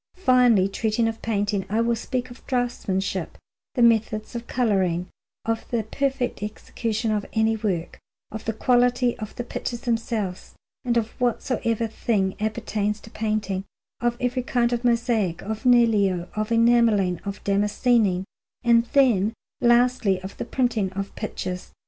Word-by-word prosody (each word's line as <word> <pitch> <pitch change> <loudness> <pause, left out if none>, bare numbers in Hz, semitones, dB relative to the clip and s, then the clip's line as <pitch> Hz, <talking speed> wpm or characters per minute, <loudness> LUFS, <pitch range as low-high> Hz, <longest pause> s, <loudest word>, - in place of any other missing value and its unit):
Finally, 250 - +4
treating 220 +3 0
of 225 0 -4
painting, 205 -2 0
I 215 +2 +1
will 235 0 +2
speak 250 +2 -3
of 245 - -13
draughtsmanship, 200 - -1
of - - -19 0.4
the 245 - +3
methods 220 -1 +2
of 235 0 -6
colouring, 190 -7 +1 0.4
of 225 0 -2
the 235 -2 0
perfect 260 +1 -2
execution 220 +1 -3
of 210 -1 0
any 220 0 +2
work, 195 -6 -3 0.3
of 220 0 -7
the 225 - -1
quality 245 +1 +2
of 215 -2 -7
the 240 - -3
pictures 240 0 -5
themselves, 225 -6 -2 0.3
and 240 -2 +1
of 225 -1 0
whatsoever 235 -1 0
thing 210 -3 -1
appertains 215 -1 -1
to 220 - -13
painting; 215 -4 -2 0.4
of 240 0 0
every 250 +1 0
kind 245 -1 +1
of 240 0 -1
mosaic, 235 -7 +1
of 220 +4 -5
niello, 210 -8 +4
of 215 +1 -2
enamelling, 230 -6 +3
of 200 0 -6
damascening, 205 -1 +2 0.4
and 235 -1 +4
then, 230 -7 +4 0.3
lastly, 240 -5 +3
of 190 - -7
the - - -4
printing 230 -7 0
of 195 +1 -4
pictures. 185 -4 -5
225 Hz, 150 wpm, -24 LUFS, 205-240 Hz, 0.4 s, Finally